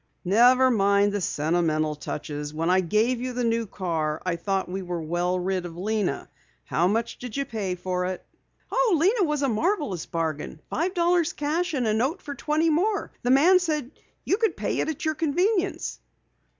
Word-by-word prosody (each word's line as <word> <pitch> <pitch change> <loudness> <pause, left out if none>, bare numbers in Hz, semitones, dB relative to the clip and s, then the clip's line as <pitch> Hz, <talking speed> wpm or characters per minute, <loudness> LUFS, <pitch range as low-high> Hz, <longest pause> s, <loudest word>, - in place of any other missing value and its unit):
"Never 250 +7 +5
mind 200 -2 +3
the 205 - -1
sentimental 155 -1 0
touches. 150 0 -6
When 165 +3 +1
I 185 - +4
gave 220 +7 +1
you 255 0 -3
the 245 0 -2
new 230 -1 0
car 160 -5 -2
I 180 -2 0
thought 190 +3 -1
we 190 +2 -4
were 175 -2 -4
well 175 +3 -1
rid 185 0 -1
of 170 -1 -8
Lena. 210 +1 -1 0.4
How 170 +2 +1
much 225 +4 -1
did 245 0 -6
you 275 - 0
pay 210 -7 -3
for 180 0 -2
it?" 185 0 -4 0.5
"Oh, - - +3
Lena 395 +6 +3
was 300 -1 0
a - - +3
marvelous 240 - -1
bargain. 160 -2 -3
Five 360 +4 -1
dollars 345 -1 +2
cash 315 +3 -1
and 255 -3 0
a 215 - +2
note 265 - 0
for 290 - -5
twenty 305 +3 +1
more. 395 +7 0
The 245 - -1
man 325 +8 +6
said 305 -7 -2 0.3
you 390 - +2
could 450 -1 0
pay - - -2
for - - +1
it - - -1
at 315 +1 -4
your 315 - +1
convenience." 360 +6 0
225 Hz, 190 wpm, -25 LUFS, -, 0.5 s, man